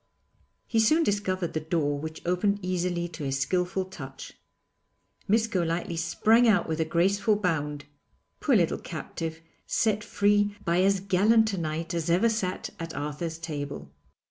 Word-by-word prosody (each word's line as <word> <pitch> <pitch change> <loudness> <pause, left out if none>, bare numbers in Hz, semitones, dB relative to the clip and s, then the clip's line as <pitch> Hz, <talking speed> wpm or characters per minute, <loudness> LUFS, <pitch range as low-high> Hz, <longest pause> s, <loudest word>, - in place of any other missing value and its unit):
He 225 - 0
soon 310 +10 +4
discovered 190 - -1
the 155 - 0
door 155 -2 -1
which 160 +1 -7
opened 180 +3 +1
easily 180 -1 -1
to 160 -2 -8
his 135 -1 -1
skilful 180 +6 0
touch. 140 -8 -9 0.9
Miss 220 +2 +3
Golightly 175 -5 -1
sprang 220 +8 +3
out 205 -6 +3
with 160 0 -2
a 160 - +2
graceful 195 +6 +2
bound 150 -7 -2 0.5
poor - - +2
little - - +2
captive, 165 0 -6 0.3
set 210 -2 +1
free 205 -1 +2
by 170 +2 +2
as 195 0 +3
gallant 215 +3 +3
a - - -2
knight 165 +1 -3
as 170 -1 -2
ever 185 +7 +4
sat 200 -5 -2
at 165 -1 -6
Arthur's 150 +3 -4
table. 145 - -6
175 Hz, 150 wpm, -27 LUFS, 160-205 Hz, 0.9 s, soon